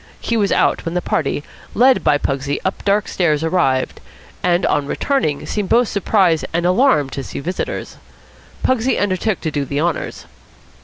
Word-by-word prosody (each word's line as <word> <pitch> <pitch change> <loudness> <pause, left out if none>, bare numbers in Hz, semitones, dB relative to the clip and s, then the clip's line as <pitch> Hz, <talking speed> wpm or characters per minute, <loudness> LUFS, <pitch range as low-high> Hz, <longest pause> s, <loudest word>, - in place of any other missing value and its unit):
He 230 - -2
was 205 -3 +1
out - - +2
when 165 0 -4
the - - +2
party, 145 -4 -1 0.3
led 255 +3 +4
by 145 - +4
Pugsy 140 0 -2
up 190 - -2
dark 205 0 +1
stairs, 155 -4 +1
arrived; 160 -7 0 0.4
and, 175 0 +2
on 140 - +1
returning, 155 - -1
seemed 205 -3 -3
both 240 -1 +3
surprised 190 -5 +2
and 170 +1 0
alarmed 180 - +3
to 135 - -4
see - - -6
visitors. 180 +6 -4 0.7
Pugsy 260 0 +1
undertook 200 0 0
to 160 - -2
do 145 -1 -1
the 140 +1 -3
honours. 165 0 -2
175 Hz, 165 wpm, -19 LUFS, 145-205 Hz, 0.7 s, led